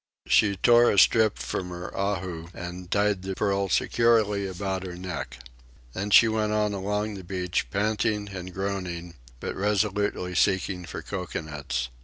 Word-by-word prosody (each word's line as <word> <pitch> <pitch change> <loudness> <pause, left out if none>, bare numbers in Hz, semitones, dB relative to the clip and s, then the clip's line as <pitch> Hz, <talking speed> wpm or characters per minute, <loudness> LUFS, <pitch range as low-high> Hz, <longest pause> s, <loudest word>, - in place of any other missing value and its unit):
She 100 -2 +4
tore 120 +4 +5
a - - +1
strip 110 +1 +5
from 90 - -4
her 90 0 -7
ahu 95 -4 -2
and 90 +1 -7
tied 100 -1 +1
the 95 0 -4
pearl 100 -1 0
securely 110 -2 +2
about 95 0 -3
her 90 -2 -6
neck. 90 -7 -6 0.6
Then 100 +2 -3
she 115 - +8
went 110 -1 0
on 105 -1 +1
along 105 +2 -2
the 95 -2 -8
beach, 90 0 -2
panting 105 0 0
and 95 -2 -7
groaning, 90 -3 -4 0.3
but - - -4
resolutely 100 -2 0
seeking 95 -1 +1
for - - -7
cocoanuts. 75 -9 -4
95 Hz, 150 wpm, -26 LUFS, 90-105 Hz, 0.6 s, she